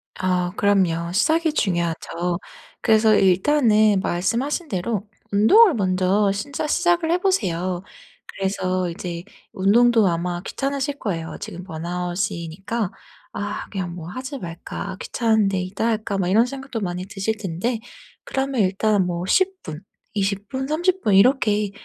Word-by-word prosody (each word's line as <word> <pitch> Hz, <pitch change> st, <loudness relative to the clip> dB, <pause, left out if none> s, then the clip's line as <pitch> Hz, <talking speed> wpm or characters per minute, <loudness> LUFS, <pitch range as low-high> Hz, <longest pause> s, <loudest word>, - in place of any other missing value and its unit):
아 180 Hz, -1 st, 0 dB
그럼요 180 Hz, -5 st, +2 dB
시작이 315 Hz, -, +2 dB
중요하죠. 170 Hz, -, -1 dB, 0.4 s
그래서 220 Hz, -1 st, +4 dB
일단은 210 Hz, +1 st, +4 dB
말씀하신 235 Hz, -, -1 dB
대로 200 Hz, -1 st, -2 dB, 0.3 s
운동을 330 Hz, -, +6 dB
먼저 190 Hz, 0 st, +2 dB
진짜 275 Hz, +9 st, -3 dB
시작을 345 Hz, 0 st, +2 dB
해 345 Hz, -, +4 dB
보세요. 185 Hz, -, 0 dB, 0.4 s
그래서 185 Hz, -2 st, -1 dB
이제 170 Hz, -1 st, -6 dB, 0.3 s
운동도 225 Hz, +3 st, +4 dB
아마 175 Hz, 0 st, -1 dB
귀찮으실 280 Hz, +6 st, -3 dB
거예요. 165 Hz, -6 st, -4 dB
지금 180 Hz, -, -7 dB
번아웃이니까 180 Hz, +3 st, -3 dB, 0.4 s
'아 205 Hz, 0 st, -4 dB
그냥 185 Hz, -4 st, -4 dB
뭐 165 Hz, -2 st, -8 dB
하지 260 Hz, +7 st, -6 dB
말까? 175 Hz, +2 st, -6 dB
귀찮은데 220 Hz, -5 st, +1 dB
이따 190 Hz, +5 st, -2 dB
할까?' 215 Hz, -3 st, -1 dB
막 185 Hz, -2 st, 0 dB
이런 220 Hz, +5 st, +5 dB
생각도 265 Hz, -2 st, -5 dB
많이 180 Hz, -2 st, -3 dB
드실 210 Hz, +2 st, -2 dB
텐데 210 Hz, +4 st, -2 dB, 0.4 s
그러면 270 Hz, -2 st, -1 dB
일단 200 Hz, +1 st, +2 dB
뭐 175 Hz, 0 st, -3 dB
10 375 Hz, -, +2 dB
분 155 Hz, 0 st, -7 dB, 0.3 s
20 200 Hz, 0 st, -1 dB
분 265 Hz, 0 st, -3 dB
30 350 Hz, +5 st, +1 dB
분 210 Hz, -, +2 dB
이렇게 210 Hz, -2 st, +3 dB
200 Hz, 280 characters per minute, -22 LUFS, 180-240 Hz, 0.4 s, 운동을